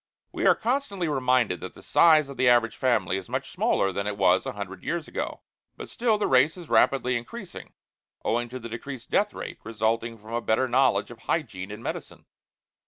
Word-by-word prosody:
We - - 0
are - - +6
constantly 225 -7 -1
reminded 125 - +1
that - - -8
the - - -14
size 155 -3 +5
of 140 - -9
the 130 -1 +3
average 115 -2 +3
family 110 -8 +1
is 95 - -8
much - - -3
smaller 95 - +1
than 100 +1 -3
it 105 -1 -3
was 95 +4 +3
a 130 - -3
hundred 95 -3 -7
years 170 -2 -3
ago - - -4 0.4
but - - -8
still 230 -3 +1
the 210 - 0
race 135 +6 +3
is 175 -3 -10
rapidly 125 -2 +3
increasing, 185 - -7 0.5
owing 120 +1 0
to 130 - -6
the 120 -2 -7
decreased 120 +2 -8
death 210 +1 +2
rate - - -7
resulting 115 +1 -1
from 110 +2 -11
a 120 - 0
better 115 +3 +1
knowledge 130 0 +2
of 120 - -11
hygiene 105 - -3
and 105 +3 -8
medicine. - - -6
120 Hz, 200 wpm, -26 LUFS, 110-150 Hz, 0.5 s, are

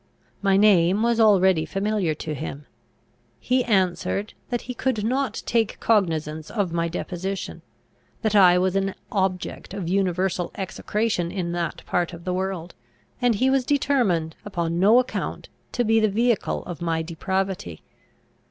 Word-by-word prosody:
My 195 -1 +3
name 195 -1 +4
was 235 0 +2
already 190 -6 +5
familiar 195 -1 -1
to 155 +1 -5
him. 145 -1 -6 0.7
He 255 - +1
answered, 195 0 0 0.2
that 240 -1 -1
he 250 - -6
could 240 -3 -1
not 265 +3 -1
take 225 -2 0
cognizance 160 -7 0
of 200 -6 -1
my 170 0 0
deposition; 185 +3 -4 0.6
that 220 -1 +1
I 180 -3 +7
was 185 +1 +1
an 195 0 0 0.2
object 190 -2 -2
of 190 -4 -4
universal 185 -1 0
execration 195 -1 -2
in 180 -3 -3
that 170 -1 -3
part 175 0 -1
of 170 0 -9
the 180 - -2
world; 185 -2 -3 0.5
and 245 -2 +3
he 260 +6 +2
was 270 -1 +2
determined 245 - +1
upon 170 -4 -2
no 210 +6 +6
account 255 0 -2 0.2
to 245 - +1
be 225 0 +3
the 215 -1 +3
vehicle 230 +2 0
of 175 -1 -7
my 165 -1 0
depravity. 180 - -3
190 Hz, 150 wpm, -24 LUFS, 170-215 Hz, 0.7 s, I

